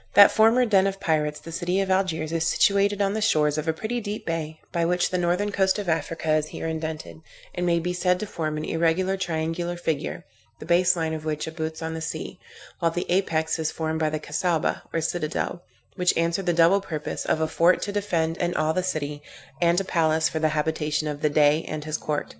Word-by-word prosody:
That 200 Hz, -, +9 dB
former 225 Hz, +3 st, +4 dB
den 195 Hz, -4 st, +4 dB
of 195 Hz, 0 st, -3 dB
pirates, 150 Hz, -4 st, 0 dB
the 165 Hz, -, -10 dB
city 180 Hz, +3 st, -1 dB
of 195 Hz, -1 st, 0 dB
Algiers 165 Hz, -5 st, 0 dB
is 165 Hz, -1 st, 0 dB
situated 200 Hz, +3 st, +3 dB
on 195 Hz, 0 st, 0 dB
the 220 Hz, -, -2 dB
shores 155 Hz, -8 st, +2 dB
of 155 Hz, -, -5 dB
a -, -, +4 dB
pretty 225 Hz, +8 st, -3 dB
deep 210 Hz, 0 st, -5 dB
bay, 160 Hz, -1 st, -3 dB
by 170 Hz, -, 0 dB
which 175 Hz, +1 st, +1 dB
the 185 Hz, -, 0 dB
northern 180 Hz, +4 st, 0 dB
coast 190 Hz, -1 st, +2 dB
of 205 Hz, -2 st, -4 dB
Africa, 160 Hz, -1 st, -1 dB
is 155 Hz, 0 st, +1 dB
here -, -, -7 dB
indented, 160 Hz, -1 st, -5 dB, 0.3 s
and 180 Hz, 0 st, -2 dB
may 170 Hz, -1 st, +3 dB
be 175 Hz, +2 st, -1 dB
said 180 Hz, 0 st, +1 dB
to 215 Hz, -, -3 dB
form 155 Hz, -6 st, -3 dB
an 155 Hz, -, -3 dB
irregular 170 Hz, +4 st, +1 dB
triangular 170 Hz, -1 st, -2 dB
figure, 160 Hz, -4 st, -3 dB, 0.3 s
the -, -, -10 dB
base 175 Hz, +2 st, +4 dB
line 160 Hz, -2 st, -1 dB
of 155 Hz, -1 st, -5 dB
which 155 Hz, -1 st, -2 dB
abuts 160 Hz, 0 st, -5 dB
on 160 Hz, 0 st, -3 dB
the 160 Hz, -, -5 dB
sea, 160 Hz, -, -5 dB, 0.4 s
while 165 Hz, -, +2 dB
the 175 Hz, +2 st, -3 dB
apex 165 Hz, -4 st, +1 dB
is 160 Hz, -1 st, 0 dB
formed 160 Hz, 0 st, -2 dB
by 155 Hz, -1 st, +1 dB
the 155 Hz, 0 st, -3 dB
Cassaubah, 160 Hz, +2 st, -1 dB
or 165 Hz, -, -1 dB
citadel, 165 Hz, +1 st, -2 dB, 0.3 s
which 180 Hz, -2 st, +2 dB
answered 170 Hz, +3 st, 0 dB
the -, -, +4 dB
double 170 Hz, +4 st, +4 dB
purpose 155 Hz, -5 st, -4 dB
of -, -, 0 dB
a 160 Hz, -, +1 dB
fort 170 Hz, +3 st, +3 dB
to 205 Hz, -, -3 dB
defend 170 Hz, -5 st, -1 dB
and 175 Hz, 0 st, -1 dB
awe 155 Hz, 0 st, +2 dB
the 185 Hz, -, 0 dB
city, 150 Hz, -5 st, -3 dB, 0.4 s
and 170 Hz, +1 st, +4 dB
a -, -, -1 dB
palace 160 Hz, -3 st, +2 dB
for 160 Hz, -, -3 dB
the 155 Hz, 0 st, +2 dB
habitation 155 Hz, 0 st, -1 dB
of 150 Hz, -1 st, -4 dB
the 150 Hz, -, +2 dB
Dey 150 Hz, +1 st, +3 dB
and 155 Hz, -1 st, -4 dB
his 155 Hz, 0 st, -2 dB
court. 150 Hz, -1 st, -3 dB
165 Hz, 225 wpm, -25 LUFS, 155-185 Hz, 0.4 s, That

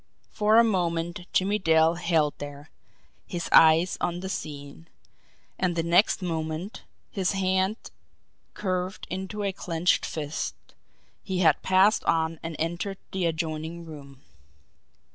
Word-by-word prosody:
For 215 Hz, +1 st, +3 dB
a 230 Hz, -, +8 dB
moment 175 Hz, -4 st, -1 dB
Jimmie 200 Hz, +3 st, +1 dB
Dale 160 Hz, -2 st, +4 dB
held 165 Hz, -4 st, +1 dB
there, 145 Hz, +1 st, -9 dB, 0.6 s
his 175 Hz, -2 st, -4 dB
eyes 165 Hz, +2 st, +6 dB
on 175 Hz, 0 st, -1 dB
the 190 Hz, -, -5 dB
scene 145 Hz, -1 st, -7 dB, 0.7 s
and 180 Hz, -2 st, 0 dB
the 165 Hz, -, 0 dB
next 175 Hz, +4 st, +3 dB
moment, 160 Hz, +3 st, -4 dB, 0.3 s
his 190 Hz, -2 st, 0 dB
hand 190 Hz, +2 st, +1 dB, 0.8 s
curved 185 Hz, -1 st, -3 dB
into 190 Hz, +3 st, -4 dB
a 195 Hz, -1 st, -1 dB
clenched 175 Hz, -1 st, 0 dB
fist, 150 Hz, -1 st, -4 dB, 0.7 s
he 185 Hz, -2 st, -2 dB
had 160 Hz, -4 st, +4 dB
passed 190 Hz, +3 st, +4 dB
on 160 Hz, -1 st, +1 dB
and 165 Hz, -1 st, -6 dB
entered 175 Hz, +4 st, -3 dB
the 185 Hz, -2 st, 0 dB
adjoining 160 Hz, +1 st, -4 dB
room. 140 Hz, -4 st, -12 dB
170 Hz, 125 wpm, -26 LUFS, 160-190 Hz, 0.8 s, a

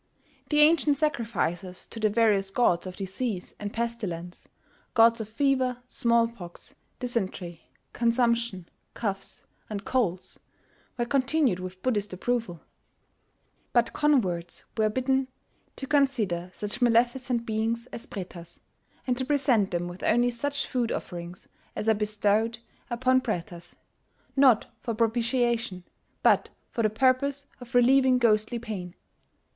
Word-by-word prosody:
The 300 Hz, -1 st, +4 dB
ancient 300 Hz, -2 st, +5 dB
sacrifices 210 Hz, -, -2 dB
to 225 Hz, -, -8 dB
the 215 Hz, -1 st, +3 dB
various 205 Hz, -3 st, +2 dB
gods 195 Hz, -5 st, +2 dB
of 185 Hz, -, -7 dB
disease 195 Hz, 0 st, -4 dB
and 205 Hz, -1 st, -4 dB
pestilence 210 Hz, -8 st, -4 dB, 0.5 s
gods 230 Hz, 0 st, +5 dB
of 215 Hz, -, -7 dB
fever, 255 Hz, +1 st, +1 dB
small 235 Hz, -2 st, +2 dB
pox, 180 Hz, -7 st, -11 dB, 0.2 s
dysentery, 190 Hz, -8 st, -4 dB, 0.2 s
consumption, 235 Hz, -5 st, +1 dB, 0.3 s
coughs, 200 Hz, -4 st, -4 dB, 0.2 s
and 205 Hz, -2 st, -5 dB
colds 195 Hz, -9 st, -1 dB, 0.6 s
were 240 Hz, -, 0 dB
continued 270 Hz, -, +2 dB
with 185 Hz, 0 st, -8 dB
Buddhist 210 Hz, -6 st, 0 dB
approval; 205 Hz, -3 st, -2 dB, 1.1 s
but 240 Hz, -1 st, +3 dB
converts 205 Hz, -, +1 dB
were 215 Hz, -1 st, +2 dB
bidden 260 Hz, +3 st, +1 dB, 0.5 s
to 270 Hz, -, -5 dB
consider 235 Hz, -, +1 dB
such 210 Hz, +5 st, -6 dB
maleficent 240 Hz, +1 st, +2 dB
beings 225 Hz, +1 st, -1 dB
as 230 Hz, -, -7 dB
Pretas, 175 Hz, -3 st, -8 dB, 0.5 s
and 250 Hz, -, +1 dB
to -, -, 0 dB
present 260 Hz, -7 st, +2 dB
them 175 Hz, 0 st, -2 dB
with 175 Hz, +1 st, -9 dB
only 240 Hz, +2 st, +3 dB
such 285 Hz, +4 st, -2 dB
food 240 Hz, -2 st, -1 dB
offerings 175 Hz, 0 st, -6 dB, 0.3 s
as 215 Hz, -, -3 dB
are 220 Hz, -, +6 dB
bestowed 210 Hz, +2 st, +1 dB, 0.3 s
upon 255 Hz, +2 st, +2 dB
Pretas 175 Hz, -6 st, -5 dB, 0.6 s
not 265 Hz, -5 st, +5 dB
for 230 Hz, -3 st, -3 dB
propitiation, 230 Hz, -3 st, 0 dB, 0.4 s
but -, -, +4 dB, 0.2 s
for 230 Hz, -, -1 dB
the 215 Hz, -, +3 dB
purpose 265 Hz, +5 st, +1 dB
of 245 Hz, -1 st, -10 dB
relieving 255 Hz, +1 st, +5 dB
ghostly 220 Hz, -1 st, +2 dB
pain. 200 Hz, -7 st, -6 dB
230 Hz, 125 wpm, -27 LUFS, 195-250 Hz, 1.1 s, are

